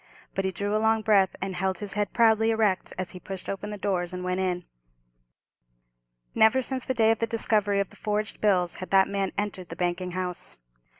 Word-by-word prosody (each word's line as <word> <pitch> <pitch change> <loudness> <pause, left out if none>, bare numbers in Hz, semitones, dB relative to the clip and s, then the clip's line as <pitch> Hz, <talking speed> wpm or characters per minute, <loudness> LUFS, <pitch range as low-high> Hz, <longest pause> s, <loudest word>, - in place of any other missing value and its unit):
But 195 - -1
he 190 - 0
drew 205 +3 -2
a 215 - +2
long 220 0 +2
breath, 200 -3 +3
and 190 0 -3
held 190 0 -1
his 200 +1 -5
head 205 0 -1
proudly 225 -1 +4
erect 220 -4 +1
as 185 -1 -3
he 180 - -9
pushed 190 0 -7
open 195 +1 -4
the 210 - -5
doors 185 -3 -1
and 180 0 -4
went 180 0 -1
in. 180 -2 -1 1.7
Never 240 +4 +4
since 260 +1 -3
the 260 - -2
day 225 -1 +4
of 225 - 0
the 230 - 0
discovery 210 -3 +2
of 200 - -1
the - - -15
forged 210 0 -3
bills 180 -5 +2
had 185 - -7
that 190 -1 +5
man 195 -1 -1
entered 200 -3 -3
the 165 - -6
banking 180 +1 -2
house. 180 - -3
195 Hz, 215 wpm, -27 LUFS, 185-215 Hz, 1.7 s, that